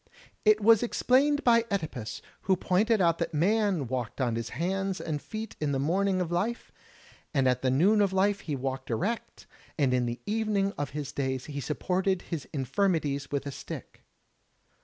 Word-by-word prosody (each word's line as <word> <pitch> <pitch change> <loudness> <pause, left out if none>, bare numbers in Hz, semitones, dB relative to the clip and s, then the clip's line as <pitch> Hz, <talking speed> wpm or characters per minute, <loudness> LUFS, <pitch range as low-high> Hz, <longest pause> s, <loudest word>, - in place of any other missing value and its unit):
It 215 0 +5
was 225 0 +6
explained 275 +4 +2
by 235 -1 +5
(Edipus, 155 - -4 0.2
who 190 - +4
pointed 210 +5 +2
out 170 -2 +3
that 170 -2 -2
man 195 -1 +2
walked 125 -1 -4
on 120 -3 +1
his 115 0 -3
hands 195 +2 -2
and 150 -3 -3
feet 220 - -6
in 145 -2 0
the 135 - 0
morning 185 +6 +1
of 170 -2 -2
life, 205 +8 -2 0.6
at 130 -2 +2
the 130 - +1
noon 190 +11 +4
of 200 -2 +2
life 195 +1 +2
he 150 -6 -4
walked 130 0 -4
erect, 200 - -3 0.3
and 135 -5 +2
in 125 -1 +1
the 120 +1 -4
evening 210 -2 0
of 145 -1 -3
his 140 -2 -4
days 130 -2 -2
he 145 -1 -5
supported 185 +5 0
his 160 -4 -5
infirmities 145 0 0
with 140 -1 -2
a 140 - -4
stick. - - -8
170 Hz, 175 wpm, -28 LUFS, 135-200 Hz, 0.6 s, was